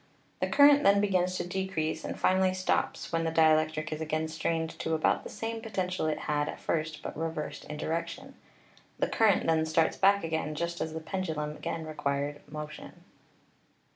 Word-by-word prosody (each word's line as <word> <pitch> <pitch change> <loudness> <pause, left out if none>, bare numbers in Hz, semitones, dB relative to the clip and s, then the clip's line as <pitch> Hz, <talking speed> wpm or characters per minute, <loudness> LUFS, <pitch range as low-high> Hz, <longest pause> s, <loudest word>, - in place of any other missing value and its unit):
The - - 0
current 285 0 +7
then 200 -7 +5
begins 185 -3 +1
to - - -2
decrease 175 -4 -2
and - - -5
finally 185 0 +3
stops 185 0 -1
when 165 -1 +1
the 165 - 0
dielectric 155 -1 +3
is 155 - -5
again 155 0 -1
strained 160 0 -1
to 160 - 0
about 155 - +1
the - - -7
same 225 0 -4
potential 185 -6 -2
it 155 - -1
had 150 0 0
at - - -7
first 155 -1 -2
but - - -5
reversed 160 -1 -4
in 150 - -6
direction. 170 - -4 0.6
The - - +1
current 215 -4 +3
then 160 -1 +3
starts 160 +1 +2
back 200 0 +4
again 160 -2 -2
just 170 +2 -3
as 160 - -2
the 160 - -4
pendulum 160 -4 -3
again 165 +1 -4
acquired 145 -1 -2
mo 150 0 -4
tion. 155 - -12
160 Hz, 180 wpm, -29 LUFS, 155-185 Hz, 0.6 s, current